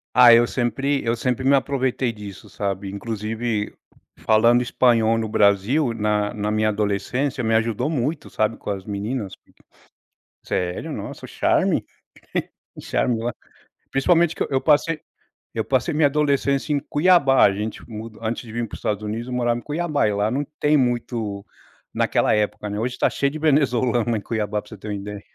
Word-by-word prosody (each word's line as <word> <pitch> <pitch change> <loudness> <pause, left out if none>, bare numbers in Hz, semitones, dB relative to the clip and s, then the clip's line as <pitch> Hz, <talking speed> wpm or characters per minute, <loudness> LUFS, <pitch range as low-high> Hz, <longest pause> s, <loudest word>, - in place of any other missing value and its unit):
Ah 125 -2 +9
eu 120 0 +6
sempre 135 +3 -1
eu 115 +1 +1
sempre 125 +2 -1
me 140 - +5
aproveitei 130 -3 0
disso, 105 -1 -10
sabe. 100 0 -3
Inclusive, 110 +1 -3 0.5
falando 115 +3 +4
espanhol 115 -2 +3
no 110 -1 -2
Brasil 105 +7 +2
na 105 -1 0
na 105 0 -2
minha 110 0 +1
adolescência 105 +6 -1
me 110 0 +1
ajudou 115 +5 +1
muito, 145 +2 -2
sabe. 110 +1 0
Com 105 - -5
as 95 -1 -5
meninas. 105 +1 -4 1.1
Sério, 90 -1 -3
nossa, - - -7
o - - -17
charme. - - +1 0.9
O - - -11
charme 115 -2 0
o 120 +1 -1 0.6
principalmente 170 +4 +3
que - - -2
eu - - -3
eu 135 -1 +1
passei 155 +1 +2 0.5
eu - - -2
passei - - 0
minha 150 -1 +4
adolescência 140 0 +1
em 145 - +2
Cuiabá, 145 - +4
gente 105 +2 -4
mu 110 +1 -7
antes 115 +2 -3
de 115 -2 -11
vim 120 0 -1
para - - -9
o - - -8
Estados 105 0 -2
Unidos 115 +3 -4
eu 125 - -5
morava 120 -1 +1
em - - -12
Cuiabá 150 -4 0
e 105 - 0
lá 105 +2 0
não 140 +3 -1 0.2
tem 150 0 +4
muito 120 -5 -1 0.5
naquela - - +2
época, 105 0 -1
né, 105 +1 -3
hoje 125 +2 -2
tá - - +2
cheio 140 - 0
de 155 - -6
venezuelano 125 -6 +2
em 105 - -2
Cuiabá 105 -2 -2
para 105 - -19
você 110 - -10
ter 105 - -10
uma 105 - -3
ideia. 100 +1 -7
115 Hz, 180 wpm, -22 LUFS, 105-135 Hz, 1.1 s, Ah